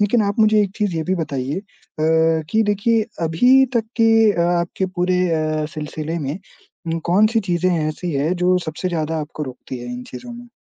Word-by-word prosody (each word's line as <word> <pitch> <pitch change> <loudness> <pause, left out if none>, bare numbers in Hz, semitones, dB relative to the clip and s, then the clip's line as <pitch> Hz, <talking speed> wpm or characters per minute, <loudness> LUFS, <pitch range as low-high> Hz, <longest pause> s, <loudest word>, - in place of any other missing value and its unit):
लेकिन 210 +2 +3
आप 200 +2 -2
मुझे 215 -1 +5
एक 200 - -2
चीज़ 205 -6 -1
ये 160 - -1
भी 185 - 0
बताइए 145 -3 -3
अ, - - -8 0.9
कि 220 0 +3
देखिए 215 +2 +2 0.2
अभी 250 +12 +5
तक 225 -2 +2 0.2
के 225 -1 +5
अ, 170 - -2 0.2
आपके 180 +2 -2
पूरे 180 0 +2
अ, 155 -1 0
सिलसिले 155 +2 -4
में 165 +2 -6
कौन-सी 215 +6 +3
चीज़ें 175 +1 +2 0.2
ऐसी 170 +2 -4
है 145 +5 +1
जो 180 0 +4
सबसे 155 +4 -3
ज़्यादा 160 -2 -2
आपको 150 0 -6
रोकती 130 -1 -7
है 120 0 -7
इन 125 0 -6
चीज़ों 125 - -8
में? 240 0 -11
175 Hz, 185 wpm, -20 LUFS, 155-210 Hz, 0.9 s, मुझे